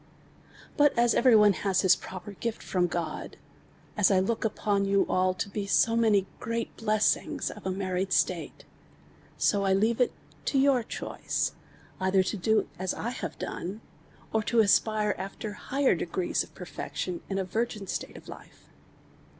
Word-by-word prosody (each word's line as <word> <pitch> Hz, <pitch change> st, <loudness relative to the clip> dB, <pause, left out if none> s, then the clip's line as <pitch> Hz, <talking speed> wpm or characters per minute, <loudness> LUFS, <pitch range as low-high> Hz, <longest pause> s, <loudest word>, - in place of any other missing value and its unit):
liut 290 Hz, -1 st, +6 dB
as 235 Hz, 0 st, +4 dB
every 240 Hz, -1 st, +5 dB
one 210 Hz, -1 st, +6 dB
has 195 Hz, 0 st, 0 dB
their 190 Hz, -, +4 dB
proper 190 Hz, +3 st, -7 dB
gift 225 Hz, +3 st, -4 dB
from 180 Hz, -2 st, +1 dB
God, 170 Hz, -1 st, -4 dB, 0.6 s
as 210 Hz, -4 st, +4 dB
1 190 Hz, -2 st, +3 dB
look 230 Hz, +2 st, -1 dB
upon 205 Hz, -2 st, 0 dB
you 200 Hz, 0 st, +2 dB
all 185 Hz, 0 st, +1 dB
to -, -, -3 dB
be 200 Hz, 0 st, -4 dB
so 225 Hz, +3 st, +3 dB
many 215 Hz, -4 st, +3 dB
great 230 Hz, +1 st, -3 dB
blessings 215 Hz, -1 st, 0 dB
of -, -, -8 dB
a -, -, 0 dB
married 185 Hz, 0 st, -2 dB
state; -, -, 0 dB, 0.7 s
so 200 Hz, -1 st, +2 dB
I 195 Hz, -1 st, +3 dB
leave 220 Hz, +5 st, +2 dB
it 250 Hz, -, +3 dB, 0.3 s
to 275 Hz, -, +1 dB
your 270 Hz, -2 st, +4 dB
choice 220 Hz, -, -3 dB, 0.5 s
either 190 Hz, 0 st, +3 dB
to 200 Hz, -, -2 dB
do 215 Hz, +3 st, +1 dB
as 185 Hz, 0 st, -2 dB
1 235 Hz, +2 st, -3 dB
Iiave -, -, -5 dB
done, 195 Hz, +6 st, -5 dB, 0.5 s
or 220 Hz, -, +2 dB
to 225 Hz, +2 st, +3 dB
aspire 215 Hz, 0 st, +3 dB
after 195 Hz, +2 st, -5 dB
higher 270 Hz, +6 st, +1 dB
degrees 175 Hz, +1 st, -1 dB
of -, -, -9 dB
perfection 180 Hz, -1 st, -5 dB
in 195 Hz, -, -2 dB
a 195 Hz, -, 0 dB
virgin 210 Hz, +2 st, -2 dB
state -, -, -5 dB
of -, -, -14 dB
life. -, -, -13 dB
205 Hz, 165 wpm, -28 LUFS, 190-225 Hz, 0.7 s, liut